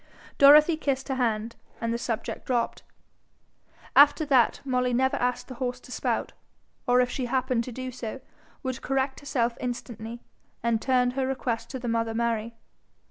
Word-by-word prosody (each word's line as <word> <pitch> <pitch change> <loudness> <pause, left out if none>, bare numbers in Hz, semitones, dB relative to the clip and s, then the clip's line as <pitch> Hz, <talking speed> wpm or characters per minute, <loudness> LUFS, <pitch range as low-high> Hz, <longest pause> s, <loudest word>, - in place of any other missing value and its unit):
Dorothy 300 +3 +8
kissed 275 -4 -2
her - - +1
hand, 230 -2 -1 0.2
and 230 0 -1
the 235 - -2
subject 230 -2 -4
dropped. 240 -2 0 1.1
After 290 +2 +6
that, 260 -6 +3
Molly 250 -2 +1
never 265 +2 +2
asked 250 0 -1
the 260 - -7
horse 250 0 -2
to - - -14
spout, - - -2 0.5
or 250 0 +5
if 250 - +1
she 260 - -2
happened 255 -1 0
to 255 - -6
do 255 +2 -5
so, 245 0 -6 0.4
would 260 -1 -3
correct 265 0 -1
herself 245 -4 -1
instantly, 235 -2 -6 0.4
and 230 -2 +1
turn 250 -1 +2
her 260 0 -1
request 235 -3 -2
to 265 - -5
the 245 -1 -6
mother 230 -1 0
Mary. 230 -1 -1
250 Hz, 165 wpm, -27 LUFS, 235-265 Hz, 1.1 s, Dorothy